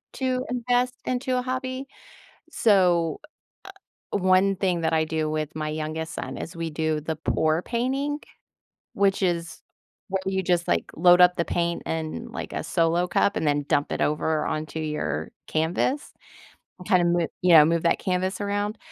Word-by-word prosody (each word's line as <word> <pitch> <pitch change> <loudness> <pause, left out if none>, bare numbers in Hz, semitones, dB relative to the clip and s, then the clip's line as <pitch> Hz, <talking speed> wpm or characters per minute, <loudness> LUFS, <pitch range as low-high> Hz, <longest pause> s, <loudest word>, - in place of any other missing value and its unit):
to 255 -1 -1
invest 250 +1 0
into 255 0 -1
a - - +1
hobby. 260 +1 -3 0.7
So, 180 - +3 0.9
one 190 0 +3
thing 180 -3 0
that 160 0 0
I 160 0 +2
do 155 -1 -1
with 155 -1 -3
my 155 -1 -3
youngest 155 +2 -4
son - - -5
is 165 - -7
we 165 0 -3
do 155 0 -1
the 160 +1 -3
pour 160 +1 +1
painting, 270 +5 -1 0.7
which 195 0 +2
is 170 -2 -1 0.5
where 190 - 0
you 190 0 -1
just, 175 -1 +1
like, 85 - 0
load 175 +2 +6
up 180 0 +6
the 170 - 0
paint 170 0 -1
in, 160 -1 -4
like, - - -5
a - - -3
solo 170 +1 +1
cup 200 - +1
and 155 - -1
then 145 0 +1
dump 145 0 +1
it - - -3
over 150 +1 0
onto 155 +1 -3
your 150 - -3 0.2
canvas 175 - -1 0.7
and 180 - -11
kinda 180 -4 +4
mo 170 -1 +2 0.2
Yeah, 165 -4 +8
move 165 +1 +1
that 170 - +2
canvas 185 +2 -1
around. 205 +1 -2
175 Hz, 165 wpm, -25 LUFS, 160-200 Hz, 0.9 s, Yeah